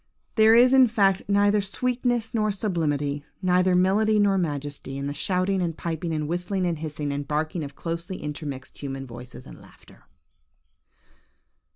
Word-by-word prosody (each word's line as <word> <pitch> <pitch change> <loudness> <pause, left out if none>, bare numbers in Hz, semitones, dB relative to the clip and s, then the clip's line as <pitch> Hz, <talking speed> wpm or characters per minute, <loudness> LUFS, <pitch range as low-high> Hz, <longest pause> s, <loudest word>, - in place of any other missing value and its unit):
"There 220 0 +6
is, 250 +2 +6
in 260 -1 +7
fact, 195 -4 +2
'neither 205 +1 +3
sweetness 240 +2 -1
nor 215 -2 +1
sublimity, 150 -8 -1 0.2
neither 180 0 +3
melody 205 +4 +3
nor 200 -1 +3
majesty, 145 -5 -3
in 140 - -4
the 140 - -3
shouting, 185 +5 0
and 165 -3 -2
piping, 165 0 -3
and 155 -2 -2
whistling, 180 +3 -2
and 170 -3 -1
hissing, 150 -2 -4
and 140 0 -4
barking 155 +3 -2
of 140 -1 -8
closely 170 +3 -4
intermixed 145 -3 -6
human 135 -1 -5
voices 120 0 -11
and - - -12
laughter.'" - - -19
175 Hz, 155 wpm, -25 LUFS, 145-205 Hz, 0.2 s, in